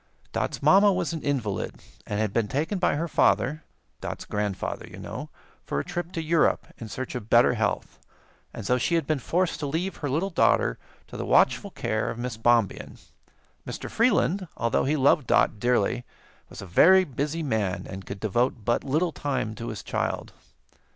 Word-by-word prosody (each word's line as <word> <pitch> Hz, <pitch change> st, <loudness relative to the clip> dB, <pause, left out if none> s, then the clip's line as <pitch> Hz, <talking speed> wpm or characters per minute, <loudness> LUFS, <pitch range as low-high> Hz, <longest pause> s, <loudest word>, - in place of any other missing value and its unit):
Dot's -, -, -2 dB
mamma 200 Hz, +1 st, +6 dB
was 180 Hz, -3 st, -1 dB
an 160 Hz, -, -4 dB
invalid, 120 Hz, -9 st, -2 dB, 0.3 s
and 105 Hz, -, -2 dB
had 110 Hz, -2 st, 0 dB
been 115 Hz, -3 st, +1 dB
taken 155 Hz, -, -1 dB
by 180 Hz, -, +2 dB
her 165 Hz, +3 st, -1 dB
father 135 Hz, -, +2 dB, 0.4 s
Dot's -, -, -6 dB
grandfather, 105 Hz, -2 st, -3 dB
you -, -, -11 dB
know -, -, -7 dB, 0.3 s
for 70 Hz, -, -2 dB
a -, -, -2 dB
trip 175 Hz, 0 st, -4 dB
to 165 Hz, -, -3 dB
Europe, 165 Hz, 0 st, +2 dB
in 115 Hz, -, -7 dB
search 130 Hz, +5 st, -5 dB
of 115 Hz, -3 st, -6 dB
better 120 Hz, +1 st, +5 dB
health, 110 Hz, -3 st, -2 dB, 0.5 s
and -, -, -8 dB
so 125 Hz, +4 st, +2 dB
she 170 Hz, +8 st, +1 dB
had 165 Hz, -, +1 dB
been 155 Hz, -1 st, 0 dB
forced 175 Hz, +7 st, 0 dB
to 145 Hz, -, -2 dB
leave 170 Hz, +7 st, -2 dB
her 145 Hz, -, -3 dB
little 165 Hz, +9 st, 0 dB
daughter -, -, +2 dB, 0.3 s
to -, -, -10 dB
the -, -, -3 dB
watchful -, -, +3 dB
care 110 Hz, 0 st, -2 dB
of -, -, -5 dB
Miss 120 Hz, -1 st, -4 dB
Bombien. 115 Hz, -2 st, +1 dB, 0.7 s
Mr. -, -, -6 dB
Freeland, 200 Hz, -5 st, +2 dB
although 115 Hz, +1 st, +1 dB
he 145 Hz, +3 st, +1 dB
loved 135 Hz, 0 st, +3 dB
Dot 110 Hz, -, +3 dB
dearly, 125 Hz, +1 st, +1 dB, 0.5 s
was -, -, -9 dB
a -, -, -7 dB
very 185 Hz, -, +6 dB
busy 150 Hz, +2 st, -3 dB
man 110 Hz, -9 st, -1 dB
and 95 Hz, +1 st, -7 dB
could 100 Hz, +1 st, -7 dB
devote 115 Hz, +2 st, 0 dB
but 120 Hz, -, +1 dB
little 155 Hz, +6 st, +1 dB
time 130 Hz, -8 st, -2 dB
to 115 Hz, +1 st, -7 dB
his 105 Hz, -, -6 dB
child. -, -, -3 dB
130 Hz, 185 wpm, -26 LUFS, 110-165 Hz, 0.7 s, mamma